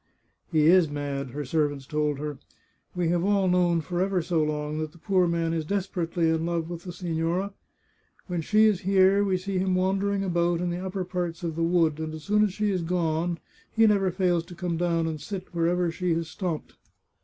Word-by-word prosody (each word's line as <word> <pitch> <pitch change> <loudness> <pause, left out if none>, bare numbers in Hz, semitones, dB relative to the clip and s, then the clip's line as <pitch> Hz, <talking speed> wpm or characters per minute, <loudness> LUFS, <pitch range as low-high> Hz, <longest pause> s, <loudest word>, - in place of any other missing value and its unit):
" - - -43
He 155 -1 +3
is 175 -1 +6
mad," 140 -2 -3
her 145 +3 -5
servants 145 -1 0
told 150 0 -1
her. 145 -1 -5 0.3
" - - -41
We 175 -2 0
have 175 0 +1
all 200 -1 +2
known 175 -2 +3
for 175 +3 -2
ever 190 -1 +1
so 165 -1 +1
long 150 0 -2
that 155 -1 -4
the - - -16
poor 185 +1 +2
man 165 -1 0
is 165 -1 -1
desperately 175 -2 -1
in 160 0 +1
love 170 0 -2
with 175 +1 -7
the - - -6
sig^ora. 175 +2 -2 0.7
When 175 -3 -2
she 215 +7 +4
is 210 -4 +3
here, 195 +1 +4
we 190 -2 +1
see 190 0 -2
him 185 0 +1
wan 190 +1 +1
dering 200 0 0
about 175 -2 +1
in 175 0 -1
the 175 +2 -4
upper 190 0 -3
parts 175 -1 -3
of 165 -2 -2
the 165 - -2
wood, 165 -2 +2
and 155 0 -4
as 155 - -9
soon 210 +3 +3
as 210 - +1
she 210 +2 0
is 185 -2 0
gone 170 0 0 0.3
he 225 0 +4
never 200 -3 +3
fails 175 -2 +1
to 175 0 -11
come 175 -1 -2
down 170 -1 +1
and 155 -2 -3
sit 190 +3 -7
wherever 170 +1 +1
she 175 0 -1
has 165 -1 -2
stopped. 170 -2 -5
175 Hz, 225 wpm, -26 LUFS, 160-185 Hz, 0.7 s, is